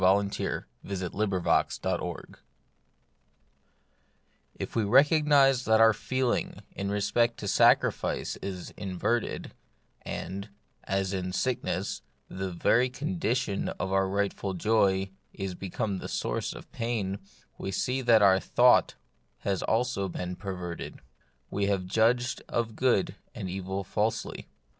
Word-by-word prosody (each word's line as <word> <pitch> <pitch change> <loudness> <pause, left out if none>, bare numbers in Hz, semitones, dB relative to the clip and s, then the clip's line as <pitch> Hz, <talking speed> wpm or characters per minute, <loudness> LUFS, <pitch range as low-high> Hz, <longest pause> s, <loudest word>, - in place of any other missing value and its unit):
CHAPTER 100 +2 +1 0.2
VII 95 -2 -4
* 90 - -6
TF 100 -4 +1 2.8
we 115 - +1
recognise 140 +2 +5
that 110 0 +4
our 115 0 +7
feeling 130 +3 -1
in 100 0 -4
respect 115 +4 +1
to 100 - -5
sacrifice - - +3
is 95 -2 -6
inverted, 100 +5 -2 0.5
and, 100 +3 -5 0.4
as 95 0 -1
in 90 -1 -2
sick 125 +5 -1
ness, 95 -4 -2 0.3
the 95 0 -4
very 120 +8 +3
condition 130 - -1
of 95 +2 -3
our 95 0 +2
rightful 100 -1 -1
joy 95 -1 +2 0.2
is 95 -1 -4
become 95 +2 -3
the - - -6
source - - -2
of - - -12
pain, 105 -5 -2 0.4
we - - -4
see 125 +7 -1
that 115 -4 +5
our 95 -1 +6
thought - - +4 0.5
has 100 -2 -1
also 115 -4 0
been 90 +1 -4
perverted; 90 -3 -6 0.5
we 100 0 0
have 100 -2 0
judged 115 +6 +2
of 115 -2 -1
good 125 -6 +1 0.2
and 95 - -4
evil 95 +1 -3
falsely. 105 +4 -2
100 Hz, 120 wpm, -28 LUFS, 95-115 Hz, 2.8 s, our